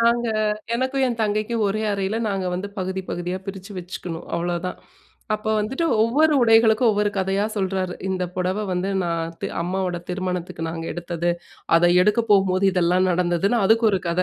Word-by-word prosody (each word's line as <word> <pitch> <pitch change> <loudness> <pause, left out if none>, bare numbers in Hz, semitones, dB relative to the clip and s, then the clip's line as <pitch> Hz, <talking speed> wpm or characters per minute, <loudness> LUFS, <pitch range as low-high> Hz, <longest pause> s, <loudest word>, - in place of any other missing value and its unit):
நாங்க 235 0 +3 0.5
எனக்கும், 260 +2 0
என் 235 -2 -2
தங்கைக்கும் 215 +2 0
ஒரே 215 +2 -1
அறையில 200 +2 -1
நாங்க 195 -2 -2
வந்து 190 +3 -4
பகுதி, 190 +1 -2
பகுதியா 175 +1 -3
பிரிச்சு 195 +1 -7
வச்சுக்கணும் 175 -1 -7
அவ்வளோதான். 175 +1 -2 0.6
அப்போ 215 +1 -3
வந்துட்டு, 265 +10 -2 0.2
ஒவ்வொரு 300 +7 +3
உடைகளுக்கும் 225 0 +5
ஒவ்வொரு 205 0 +1
கதையா 195 +2 +1
சொல்றாரு. 190 -2 -1
இந்த 185 -1 -1
புடவை 185 +3 -1
வந்து 180 +2 -1 0.2
நான் 165 -1 -2
தெ - - -1
அம்மாவோட 180 0 -2
திருமணத்துக்கு 180 -3 -3
நாங்க 165 0 -5
எடுத்தது. 175 0 -2 0.5
அத 175 +1 +4
எடுக்கபோகும்போது 200 -3 +3
இதெல்லாம் 180 +1 +2
நடந்ததுன்னு, 180 +5 +1
அதுக்கு 225 +2 +4
ஒரு 190 - +1
கத. 170 +2 +1
190 Hz, 150 wpm, -23 LUFS, 180-215 Hz, 0.6 s, உடைகளுக்கும்